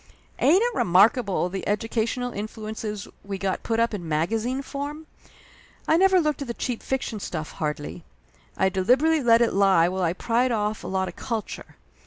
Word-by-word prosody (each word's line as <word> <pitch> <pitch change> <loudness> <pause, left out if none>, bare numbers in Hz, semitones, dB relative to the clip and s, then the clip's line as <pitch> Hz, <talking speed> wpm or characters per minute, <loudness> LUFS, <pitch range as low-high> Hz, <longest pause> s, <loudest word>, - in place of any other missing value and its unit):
Ain't 365 +9 +5
it 485 0 0
remarkable 200 - +3
the 190 +1 -5
educational 225 +4 -1
influences 215 0 -5 0.2
we 200 -1 -5
got 190 -1 -2
put 225 -1 -1
up 230 -1 +2
in 180 -5 -5
magazine 225 - -1
form? 290 +3 -6 0.8
I 315 - +4
never 380 +1 +5
looked 300 -4 0
at 280 - -4
the 235 - -4
cheap 245 -3 -3
fiction 255 -5 -3
stuff, 160 -5 -5
hardly. 150 +2 -4 0.5
I 190 - +3
deliberately 255 - +2
let 235 -1 +5
it 230 - 0
lie 190 -4 +4
while 190 +1 -3
I 170 -2 +1
pried 240 +6 +1
off 210 -1 -1
a - - -6
lot 190 0 -1
of - - -8
culture. 225 -3 -5
220 Hz, 175 wpm, -25 LUFS, 190-255 Hz, 0.8 s, Ain't